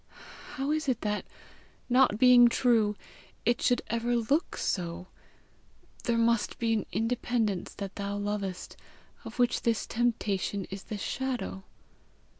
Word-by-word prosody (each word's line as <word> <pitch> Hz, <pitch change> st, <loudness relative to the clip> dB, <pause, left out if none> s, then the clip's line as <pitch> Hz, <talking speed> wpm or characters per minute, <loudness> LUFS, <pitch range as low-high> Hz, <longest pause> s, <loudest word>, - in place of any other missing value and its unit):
How 275 Hz, +1 st, -1 dB
is 310 Hz, -2 st, 0 dB
it 245 Hz, -3 st, 0 dB
that, 210 Hz, 0 st, -2 dB, 0.6 s
not 250 Hz, -4 st, +4 dB
being 245 Hz, 0 st, +8 dB
true, 230 Hz, -3 st, +2 dB, 0.5 s
it 240 Hz, +1 st, +2 dB
should 245 Hz, -, +2 dB
ever 235 Hz, +2 st, 0 dB
look 275 Hz, -, 0 dB
so? 175 Hz, -1 st, -2 dB, 1.0 s
There 235 Hz, -1 st, +1 dB
must 230 Hz, -1 st, +1 dB
be 230 Hz, -1 st, +1 dB
an 215 Hz, -3 st, -1 dB
independence 225 Hz, -1 st, -1 dB
that 200 Hz, -1 st, -6 dB
thou 200 Hz, 0 st, -3 dB
lovest, 205 Hz, -2 st, -4 dB, 0.5 s
of 225 Hz, 0 st, -8 dB
which 245 Hz, -1 st, +2 dB
this 230 Hz, -2 st, 0 dB
temptation 205 Hz, -4 st, -1 dB
is 195 Hz, 0 st, -7 dB
the 215 Hz, -, -5 dB
shadow! 245 Hz, -4 st, -3 dB
230 Hz, 130 wpm, -29 LUFS, 205-245 Hz, 1.0 s, being